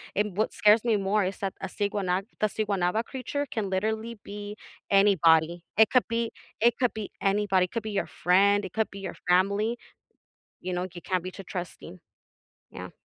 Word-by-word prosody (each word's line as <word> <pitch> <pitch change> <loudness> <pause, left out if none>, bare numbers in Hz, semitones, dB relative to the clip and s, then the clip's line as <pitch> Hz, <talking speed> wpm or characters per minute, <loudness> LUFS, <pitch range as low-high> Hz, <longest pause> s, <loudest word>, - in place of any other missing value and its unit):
and 205 -2 0
what 215 - 0
scares 210 +2 +5
me 230 - +3
more 200 +1 +1
is 185 +1 -3
that 195 -1 -2
a - - -3
Siguana 195 -1 -1 0.2
the 215 - +3
Siguanaba 205 -1 0
creature 270 +3 -4
can 220 -7 -3
literally 220 +4 -2
be 205 0 -7 0.3
anybody, 170 -4 +4
it 220 0 +6
could 250 - +3
be 230 0 -1 0.3
it 235 0 +4
could 250 -2 +1
be 215 -2 -6
anybody, 195 -2 +2
it 180 - -13
could 230 -2 -3
be 215 - -4
your 200 -1 -1
friend, 200 +3 +3
it 185 - -7
could 220 -1 0
be 200 - -9
your 195 - -6
family, 200 +6 +2 0.8
you 185 0 -4
know, 180 +1 -2
you 175 - -9
can't 185 -2 -1
be 185 - -5
too 195 - -10
trusting. 180 -1 -7 0.7
Yeah. - - -8
200 Hz, 190 wpm, -27 LUFS, 185-220 Hz, 0.8 s, it